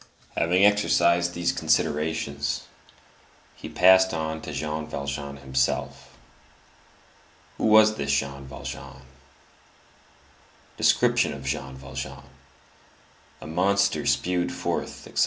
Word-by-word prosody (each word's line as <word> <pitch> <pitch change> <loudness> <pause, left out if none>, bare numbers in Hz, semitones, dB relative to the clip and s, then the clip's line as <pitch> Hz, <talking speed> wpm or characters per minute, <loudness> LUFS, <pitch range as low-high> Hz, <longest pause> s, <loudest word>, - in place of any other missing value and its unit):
Having 90 +3 +2
exhausted 85 -4 +3
these 85 0 0
considerations, 75 -1 -1 0.9
he - - -9
passed 95 -1 +5
on 80 0 -3
to 80 - -7
Jean 75 +2 -4
Valjean 70 0 -5
himself. 65 -1 -2 1.4
Who - - 0
was 110 0 +6
this 70 -1 -2
Jean 70 0 -2
Valjean? 65 0 -9 1.7
Description - - +2
of 70 -1 -9
Jean 65 0 -3
Valjean: 65 0 -7 1.2
a - - -9
monster 95 +5 +1
spewed 90 -1 0
forth, - - -4
etc. - - -5
75 Hz, 100 wpm, -25 LUFS, 70-90 Hz, 1.7 s, was